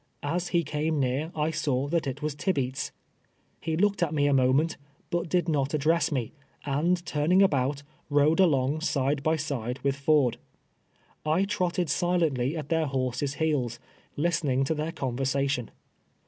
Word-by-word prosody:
As 175 Hz, +5 st, -1 dB
he 170 Hz, -1 st, +1 dB
came 150 Hz, +1 st, -1 dB
near 135 Hz, +5 st, -1 dB
I 155 Hz, +1 st, 0 dB
saw 140 Hz, -4 st, 0 dB
that 165 Hz, -2 st, 0 dB
it 140 Hz, +3 st, -4 dB
was 150 Hz, -1 st, -1 dB
Tibeats! 140 Hz, -4 st, -1 dB, 0.7 s
He 160 Hz, 0 st, -2 dB
looked 200 Hz, +1 st, +2 dB
at 160 Hz, -2 st, +1 dB
me 145 Hz, -1 st, +2 dB
a 145 Hz, -, +3 dB
moment, 135 Hz, +5 st, +3 dB, 0.4 s
but 170 Hz, -1 st, -1 dB
did 175 Hz, 0 st, +1 dB
not 145 Hz, -2 st, 0 dB
address 160 Hz, +4 st, +2 dB
me, 125 Hz, -6 st, -2 dB, 0.3 s
and 170 Hz, +5 st, +1 dB
turning 170 Hz, +4 st, +3 dB
about, 140 Hz, -4 st, +1 dB, 0.3 s
rode 145 Hz, +3 st, +3 dB
along 150 Hz, -4 st, +3 dB
side 140 Hz, -3 st, 0 dB
by 155 Hz, +3 st, +2 dB
side 130 Hz, -6 st, -3 dB
with 140 Hz, -1 st, +1 dB
Ford. 140 Hz, -3 st, +2 dB, 0.9 s
I 155 Hz, +5 st, +2 dB
trotted 180 Hz, -3 st, -1 dB
silently 160 Hz, -4 st, +1 dB
at 150 Hz, -2 st, -6 dB
their 160 Hz, -2 st, +1 dB
horses' 135 Hz, +1 st, -2 dB
heels, 145 Hz, -7 st, 0 dB, 0.4 s
listing 150 Hz, -4 st, +1 dB
to 135 Hz, -, 0 dB
their 155 Hz, +1 st, -3 dB
conversation. 135 Hz, -2 st, -1 dB
150 Hz, 155 wpm, -27 LUFS, 135-165 Hz, 0.9 s, a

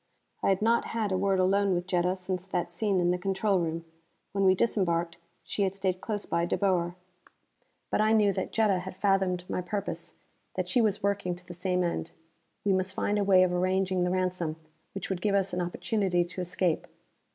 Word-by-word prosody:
I -, -, +2 dB
had 195 Hz, +1 st, +2 dB
not 230 Hz, +1 st, +3 dB
had 220 Hz, -3 st, -2 dB
a 190 Hz, -, +1 dB
word 195 Hz, 0 st, +2 dB
alone 195 Hz, +1 st, +3 dB
with 175 Hz, 0 st, -2 dB
Jetta 180 Hz, 0 st, +1 dB
since 185 Hz, -1 st, -4 dB
that 175 Hz, -2 st, -2 dB
scene 200 Hz, 0 st, +1 dB
in 175 Hz, 0 st, +3 dB
the 180 Hz, -, 0 dB
control 195 Hz, +1 st, +1 dB
room. 165 Hz, 0 st, -2 dB, 0.5 s
When 195 Hz, 0 st, 0 dB
we 185 Hz, 0 st, +6 dB
disembarked, 175 Hz, -6 st, +1 dB, 0.3 s
she -, -, -3 dB
had 195 Hz, -1 st, +1 dB
stayed 190 Hz, -2 st, -1 dB
close 210 Hz, -2 st, -3 dB
by 170 Hz, 0 st, 0 dB
De -, -, 0 dB
Boer. 180 Hz, -3 st, +1 dB, 1.0 s
But -, -, +2 dB
I 215 Hz, +1 st, +3 dB
knew 210 Hz, -3 st, +4 dB
that -, -, -3 dB
Jetta 210 Hz, -4 st, +2 dB
had 185 Hz, +1 st, -7 dB
fathomed 190 Hz, -3 st, +1 dB
my -, -, -2 dB
purpose, 200 Hz, +3 st, -4 dB, 0.4 s
that -, -, -1 dB
she 250 Hz, -, +3 dB
was 210 Hz, -3 st, +1 dB
working 200 Hz, -3 st, 0 dB
to 180 Hz, 0 st, -12 dB
the 175 Hz, -, -7 dB
same 180 Hz, +1 st, 0 dB
end. 125 Hz, -, -2 dB, 0.6 s
We 200 Hz, -, +3 dB
must 185 Hz, 0 st, -1 dB
find 205 Hz, 0 st, 0 dB
a -, -, +2 dB
way 190 Hz, -2 st, +6 dB
of 180 Hz, -1 st, +1 dB
arranging 185 Hz, 0 st, +1 dB
the 180 Hz, -, +1 dB
ransom 180 Hz, -3 st, -1 dB, 0.4 s
which 195 Hz, 0 st, -5 dB
would 185 Hz, -2 st, -2 dB
give 205 Hz, -2 st, +2 dB
us 195 Hz, -2 st, +1 dB
an 180 Hz, -, 0 dB
opportunity 180 Hz, 0 st, 0 dB
to 180 Hz, +1 st, -6 dB
escape. 175 Hz, -1 st, 0 dB
185 Hz, 210 wpm, -29 LUFS, 180-200 Hz, 1.0 s, we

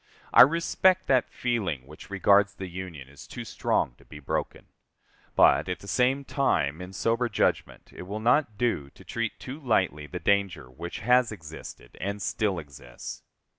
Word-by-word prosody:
I -, -, +10 dB
respect 170 Hz, +5 st, +4 dB
that 130 Hz, -2 st, +2 dB
feeling 100 Hz, -, -2 dB
which 75 Hz, +7 st, -13 dB
regards 100 Hz, 0 st, +3 dB
the 95 Hz, -, -6 dB
Union 85 Hz, -6 st, -7 dB
as 70 Hz, +1 st, -13 dB
too -, -, -7 dB
strong -, -, 0 dB
to -, -, -20 dB
be 75 Hz, -, -11 dB
broken. 75 Hz, -, -4 dB, 0.7 s
But, -, -, +5 dB
at 90 Hz, -, -2 dB
the 100 Hz, -, -13 dB
same 130 Hz, +7 st, +1 dB
time, 85 Hz, -, 0 dB
in 90 Hz, +1 st, -8 dB
sober 115 Hz, +5 st, 0 dB
judgment, -, -, -1 dB
it 90 Hz, -, -9 dB
will 105 Hz, +2 st, -4 dB
not 120 Hz, -1 st, +2 dB
do 110 Hz, -, 0 dB
to -, -, -15 dB
treat 115 Hz, -2 st, -3 dB
too 135 Hz, +4 st, -7 dB
lightly 95 Hz, -, 0 dB
the -, -, -6 dB
danger 100 Hz, -10 st, 0 dB
which 85 Hz, +7 st, -7 dB
has 125 Hz, -1 st, +4 dB
existed 80 Hz, -, -10 dB
and 100 Hz, +2 st, -3 dB
still 100 Hz, -1 st, -1 dB
exists. 70 Hz, -6 st, -9 dB
100 Hz, 170 wpm, -27 LUFS, 80-120 Hz, 0.7 s, I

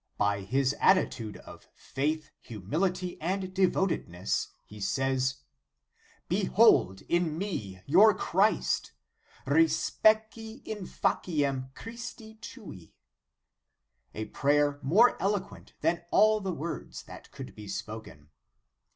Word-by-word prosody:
By 100 Hz, -1 st, 0 dB
this 135 Hz, +5 st, +1 dB
attitude 115 Hz, -, +2 dB
of -, -, -14 dB
faith, 150 Hz, +2 st, -3 dB
humility, 175 Hz, -, -3 dB
and 185 Hz, +2 st, -2 dB
devotedness, 185 Hz, -, 0 dB, 0.2 s
he 105 Hz, -, -12 dB
says: 130 Hz, +5 st, -1 dB, 0.8 s
"Behold 90 Hz, +8 st, +3 dB
in 170 Hz, -3 st, 0 dB
me 110 Hz, -, -4 dB
your 200 Hz, +8 st, +6 dB
Christ, 200 Hz, +5 st, +1 dB, 0.5 s
respice 220 Hz, -, +2 dB
in 210 Hz, -4 st, -5 dB
faciem 140 Hz, -6 st, -1 dB
Christi 230 Hz, -1 st, -9 dB
tui;" 205 Hz, -, -11 dB, 1.2 s
a 110 Hz, -, -3 dB
prayer 145 Hz, +2 st, +1 dB
more 195 Hz, -, +4 dB
eloquent 195 Hz, -1 st, -3 dB
than 165 Hz, +2 st, +1 dB
all 215 Hz, +2 st, +4 dB
the 190 Hz, -1 st, -2 dB
words 165 Hz, 0 st, -6 dB
that -, -, -12 dB
could 135 Hz, -2 st, -9 dB
be 105 Hz, -1 st, -11 dB
spoken. 100 Hz, -6 st, -7 dB
155 Hz, 100 wpm, -29 LUFS, 120-195 Hz, 1.2 s, your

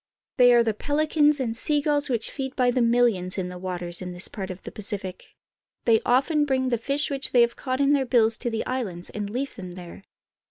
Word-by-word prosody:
They 245 Hz, -1 st, +6 dB
are 235 Hz, -, +5 dB
the 225 Hz, -1 st, 0 dB
peHcans 295 Hz, +4 st, +1 dB
and 230 Hz, -4 st, -2 dB
sea 295 Hz, +5 st, +2 dB
gulls 290 Hz, -1 st, +1 dB
which 235 Hz, -3 st, -1 dB
feed 265 Hz, -1 st, -5 dB
by 250 Hz, -2 st, +2 dB
the 250 Hz, 0 st, 0 dB
millions 230 Hz, -6 st, +2 dB
in 180 Hz, -1 st, -3 dB
the 180 Hz, 0 st, -8 dB
waters 175 Hz, -1 st, -4 dB
of 180 Hz, 0 st, -5 dB
this 175 Hz, +2 st, -5 dB
part 195 Hz, -2 st, -6 dB
of 185 Hz, 0 st, -8 dB
the -, -, -8 dB
Pacific. 195 Hz, -3 st, -6 dB, 0.5 s
They 225 Hz, -2 st, +4 dB
often 280 Hz, +5 st, +2 dB
bring 260 Hz, -2 st, 0 dB
the 235 Hz, -2 st, 0 dB
fish 280 Hz, +4 st, +1 dB, 0.2 s
they 245 Hz, -, +5 dB
have 235 Hz, 0 st, +2 dB
caught 260 Hz, -1 st, -3 dB
in 280 Hz, +1 st, +3 dB
their 270 Hz, -2 st, +1 dB
bills 230 Hz, -2 st, +4 dB
to 240 Hz, -, -3 dB
the 225 Hz, -1 st, -3 dB
islands 205 Hz, -10 st, -3 dB
and 205 Hz, -1 st, -5 dB
leave 260 Hz, +5 st, -4 dB
them 185 Hz, -4 st, -9 dB
there. 175 Hz, +1 st, -10 dB
235 Hz, 225 wpm, -25 LUFS, 195-270 Hz, 0.5 s, They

